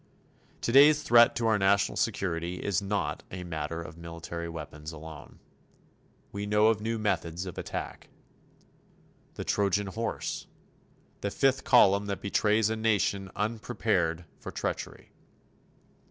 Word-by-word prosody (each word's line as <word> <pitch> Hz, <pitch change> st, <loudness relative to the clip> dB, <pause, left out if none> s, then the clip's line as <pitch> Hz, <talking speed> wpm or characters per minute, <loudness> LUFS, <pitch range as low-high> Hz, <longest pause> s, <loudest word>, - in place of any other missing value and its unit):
Today's 145 Hz, +5 st, +6 dB
threat 120 Hz, -2 st, +6 dB
to 120 Hz, -, -1 dB
our 110 Hz, -2 st, +3 dB
national 100 Hz, +1 st, +3 dB
security 85 Hz, -1 st, -1 dB
is 95 Hz, +1 st, -1 dB
not 100 Hz, +1 st, -2 dB
a 90 Hz, -1 st, -6 dB
matter 80 Hz, -1 st, -4 dB
of 80 Hz, 0 st, -11 dB
military 85 Hz, 0 st, -6 dB
weapons 75 Hz, -1 st, -7 dB
alone. 80 Hz, -2 st, -11 dB, 0.9 s
We 100 Hz, +1 st, -4 dB
know 105 Hz, +1 st, +4 dB
of 110 Hz, -2 st, +1 dB
new 115 Hz, +1 st, -1 dB
methods 90 Hz, -4 st, -1 dB
of 90 Hz, -, -7 dB
attack. -, -, -6 dB, 1.3 s
The -, -, -4 dB
Trojan 100 Hz, 0 st, +1 dB
Horse. 110 Hz, +4 st, -4 dB, 0.7 s
The 100 Hz, -, -1 dB
Fifth 135 Hz, +5 st, +1 dB
Column 100 Hz, -4 st, +5 dB
that 100 Hz, -, -3 dB
betrays 105 Hz, +1 st, +2 dB
a -, -, 0 dB
nation 100 Hz, -3 st, 0 dB
unprepared 105 Hz, -6 st, -1 dB
for -, -, -7 dB
treachery. -, -, -5 dB
100 Hz, 125 wpm, -29 LUFS, 85-110 Hz, 1.3 s, Today's